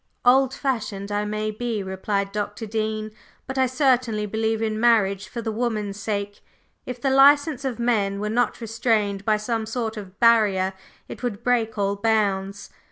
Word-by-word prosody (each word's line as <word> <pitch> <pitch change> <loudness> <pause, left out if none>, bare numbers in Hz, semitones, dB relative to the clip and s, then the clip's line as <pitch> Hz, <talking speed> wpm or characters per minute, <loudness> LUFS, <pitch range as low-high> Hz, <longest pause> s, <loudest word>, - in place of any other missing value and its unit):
"Old 260 +1 +5
fashioned 210 -7 -3
I 205 0 0
may 215 +1 -2
be," 220 -1 -3
replied 195 +1 -2
Dr. 205 +2 -4
Dean; 215 0 -3 0.3
"but 265 0 -4
I 260 - +4
certainly 250 -5 +1
believe 220 +1 -1
in 220 -1 -1
marriage 210 -4 +3
for 235 +1 -6
the 220 - -2
woman's 215 -3 -2
sake. 205 -1 -3 0.5
If 250 -1 -5
the 270 +2 0
license 285 +1 +5
of 255 -3 -2
men 210 -5 0
were 210 - -2
not 240 +3 0
restrained 220 -3 0
by 215 -1 +3
some 220 +1 -2
sort 225 -1 -3
of 195 -2 -9
barrier 210 -5 +4 0.3
it - - -9
would 235 -3 -4
break 230 -3 +1
all 200 0 0
bounds. 200 -2 -1
220 Hz, 165 wpm, -23 LUFS, 205-240 Hz, 0.5 s, Old